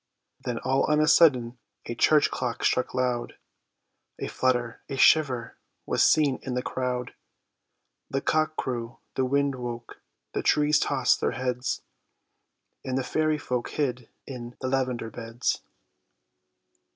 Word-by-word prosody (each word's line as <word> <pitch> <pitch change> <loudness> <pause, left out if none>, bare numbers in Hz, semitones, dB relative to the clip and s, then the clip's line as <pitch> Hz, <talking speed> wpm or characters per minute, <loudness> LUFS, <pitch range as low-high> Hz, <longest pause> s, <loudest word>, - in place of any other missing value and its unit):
Then 120 -2 -2
all 130 +3 +1
on 150 0 +2
a 155 - +3
sudden 125 -8 +4 0.3
a 120 - -4
church 150 +5 +4
clock 120 -2 -3
struck 125 - +1
loud: 125 -2 -1 0.8
A - - -4
flutter, 120 -2 0
a 135 - -4
shiver, 130 -5 +3 0.3
was - - 0
seen 145 -4 +4
in 130 -2 -4
the 125 - -1
crowd, 125 -1 -3 1.0
The 135 - 0
cock 155 +2 +1
crew, 120 -2 -4 0.2
the 130 - 0
wind 140 +1 +1
woke, 120 -2 -7 0.3
the - - -1
trees 150 0 +3
tossed - - +2
their - - +1
heads, 125 -1 -2 1.0
And 130 0 -2
the 135 - 0
fairy 155 +3 +1
folk 125 -4 -3
hid 125 -5 -2 0.2
in 120 -3 -8
the 130 - -2
lavender 130 -4 -1
beds. 115 +1 -2
130 Hz, 140 wpm, -27 LUFS, 120-140 Hz, 1.0 s, sudden